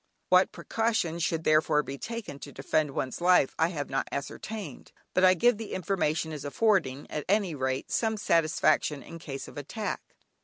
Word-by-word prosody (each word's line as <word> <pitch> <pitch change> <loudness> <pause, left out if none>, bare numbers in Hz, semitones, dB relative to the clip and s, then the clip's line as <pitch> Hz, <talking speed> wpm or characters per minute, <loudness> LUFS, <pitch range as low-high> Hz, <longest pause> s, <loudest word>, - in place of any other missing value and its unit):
What 185 +1 +5
precautions 220 -8 -1
should 165 0 0
therefore 155 -1 +3
be 140 0 -7
taken 230 -11 -6
to 145 - -9
defend 145 +3 0
one's 135 +2 -3
life 180 -6 +4
I 160 - +4
have 150 -5 -4
not 135 - -1
ascertained, 165 - -6 0.2
but 185 - +2
I 185 0 +7
give 240 +6 +4
the 225 - -6
information 160 -4 0
as 150 -3 -6
affording 145 -4 +1
at 150 - -3
any 200 -4 +2
rate 130 -1 -2
some 220 -1 +1
satisfaction 155 -5 +2
in 165 - -10
case 135 -4 -6
of - - -8
attack. 210 +9 -4
160 Hz, 175 wpm, -28 LUFS, 145-195 Hz, 0.2 s, I